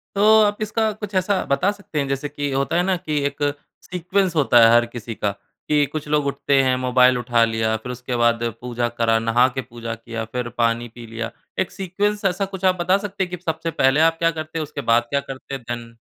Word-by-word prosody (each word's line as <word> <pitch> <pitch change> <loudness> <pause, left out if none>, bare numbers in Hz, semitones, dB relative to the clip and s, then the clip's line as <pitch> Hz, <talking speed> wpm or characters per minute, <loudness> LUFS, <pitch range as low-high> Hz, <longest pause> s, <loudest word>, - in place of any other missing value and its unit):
तो 200 - +2 0.2
आप 205 0 +1
इसका 215 +1 0
कुछ 210 -1 -6
ऐसा 185 +1 +1
बता 180 +9 +1
सकते 200 -7 -6
हैं 140 - -1
जैसे 135 +1 -2
कि 145 -1 -3
होता 135 +3 0
है 175 - +3
ना 190 0 +1
कि 155 -4 -2
एक 140 0 -3 0.4
सीक्वेंस 180 0 -1
होता 135 -5 +5
है 115 - +7
हर 120 0 +5
किसी 115 -1 -7
का, 100 - -1
कि 145 +8 -2
कुछ 150 +2 -6
लोग 150 -1 +1
उठाते 140 0 +2
हैं 130 -1 +2
मोबाइल 125 0 +4
उठा 120 -1 +2
लिया 110 -1 0
फिर 125 +3 -7
उसके 125 0 -4
बाद 115 0 +2 0.2
पूजा 120 -1 -2
करा 115 -1 +3
नहा 115 +2 +3
के 130 - -1
पूजा 115 -2 -7
किया 115 0 -6
फिर 125 -1 -2
पानी 115 0 +1
पी 120 - -9
लिया। 115 +1 -5 0.3
एक 185 - 0
सीक्वेंस 200 +2 -2
ऐसा 195 +1 +1
कुछ 190 -1 -6
आप 185 - +4
बता 185 +3 +3
सकते 200 -1 -3
हैं 180 - -4
कि 180 - -3
सबसे 160 +1 -2
पहले 135 +1 +3
आप 165 0 +4
क्या 165 0 +3
करते 155 0 -5
हैं - - -1
उसके 145 -1 -6
बाद 115 -1 +3
क्या 140 - +1
करते 135 0 -9
है? - - -5
देन? 115 -1 -7
140 Hz, 235 wpm, -22 LUFS, 120-180 Hz, 0.4 s, है